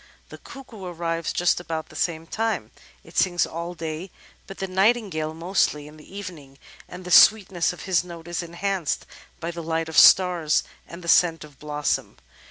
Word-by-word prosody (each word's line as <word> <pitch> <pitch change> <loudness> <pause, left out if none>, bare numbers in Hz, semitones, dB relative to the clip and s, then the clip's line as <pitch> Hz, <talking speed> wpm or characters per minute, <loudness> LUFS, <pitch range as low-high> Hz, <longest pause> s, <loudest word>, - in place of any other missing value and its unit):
The - - -11
Cuckoo 245 -7 -12
arrives 170 -2 -3
just 175 0 +1
about 160 -2 -5
the - - -15
same 165 -2 -2
time. 225 +5 -2 0.3
It - - -17
sings 175 -2 +2
all 170 +2 -6
day, 165 +2 -5 0.4
but 195 - -9
the 195 - -3
Nightingale 190 -5 +1
mostly 165 -4 0
in 150 +1 -14
the 170 +6 -13
evening, 155 -9 -9 0.3
and 180 0 -10
the 180 - -6
sweetness 190 -4 +5
of 180 - -10
his 185 -2 +1
note 170 -2 -10
is 175 0 -3
enhanced 170 0 -2 0.3
by 170 +1 -4
the 170 0 -7
light 165 0 -2
of 160 - +4
stars 175 -5 +5 0.2
and 170 +1 -10
the - - -9
scent 165 -2 +4
of 145 -3 -15
blossom. 150 -1 -2
170 Hz, 180 wpm, -24 LUFS, 160-185 Hz, 0.4 s, sweetness